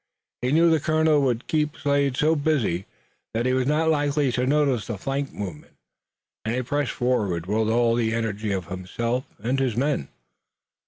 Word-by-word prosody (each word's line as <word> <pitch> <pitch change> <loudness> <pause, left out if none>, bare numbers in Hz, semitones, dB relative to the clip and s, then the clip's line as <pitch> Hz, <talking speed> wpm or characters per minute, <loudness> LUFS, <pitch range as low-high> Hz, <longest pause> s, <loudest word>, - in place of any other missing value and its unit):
He 125 +1 0
knew 165 +2 +5
the 160 - +4
colonel 155 -1 +3
would 125 -3 0
keep 150 -1 0
Slade 140 -3 +1
so 155 +1 +3
busy 140 - 0 0.5
that 115 +2 0
he 130 - +2
was 130 0 +1
not 155 +2 +2
likely 145 -2 +1
to 125 +1 0
notice 140 -6 +2
the 115 - -3
flank 135 +6 -3
movement, 90 -7 -7 0.7
and 110 +2 -1
he 130 - -1
pressed 145 +1 -1
forward 105 -9 0
with 110 +3 0
all 115 0 +3
the 115 -1 +1
energy 110 -2 -2
of 95 -2 -2
himself 115 +8 -3 0.2
and 130 +4 0
his 125 -4 0
men. 135 - 0
125 Hz, 175 wpm, -24 LUFS, 110-145 Hz, 0.7 s, knew